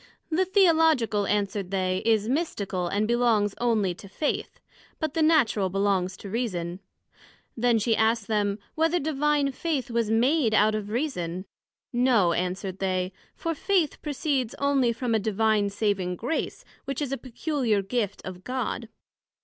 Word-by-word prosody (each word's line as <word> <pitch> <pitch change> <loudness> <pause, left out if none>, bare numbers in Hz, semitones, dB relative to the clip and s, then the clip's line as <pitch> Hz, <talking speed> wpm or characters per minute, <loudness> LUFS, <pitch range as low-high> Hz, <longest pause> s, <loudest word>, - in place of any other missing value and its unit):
The 365 +4 +2
Theological, 320 - +3
answered 200 -2 -1
they, 185 -1 0
is 220 -2 +2
mystical, 205 - -1
and 205 +4 0
belongs 230 -4 +2
onely 215 -6 +2
to 195 - -12
Faith; 295 +9 -3 0.4
but 315 -3 -2
the 325 - 0
Natural 260 - +3
belongs 190 -1 0
to 200 - -9
Reason. 185 -7 -2 0.8
Then 235 0 +3
she 225 +1 +2
asked 220 0 +2
them, 205 -2 0 0.2
Whether 325 +2 +2
Divine 295 -1 +1
Faith 275 -3 -2
was 230 -2 0
made 235 +1 +3
out 215 +1 +4
of 210 -1 -3
Reason? 185 - -2 0.5
No 240 -8 +3
answered 185 +2 -3
they, 185 -1 -1 0.2
for 330 - -2
Faith 345 -1 0
proceeds 280 -5 -1
onely 275 -3 +2
from 235 0 -2
a 220 - +3
Divine 215 0 +1
saving 200 -3 -1
Grace, 245 - -3 0.2
which 275 0 -3
is 285 -3 -2
a - - +1
peculiar 250 -5 -1
Gift 205 -1 -2
of 185 -1 -8
God. 250 -2 -3
225 Hz, 150 wpm, -26 LUFS, 200-275 Hz, 0.8 s, out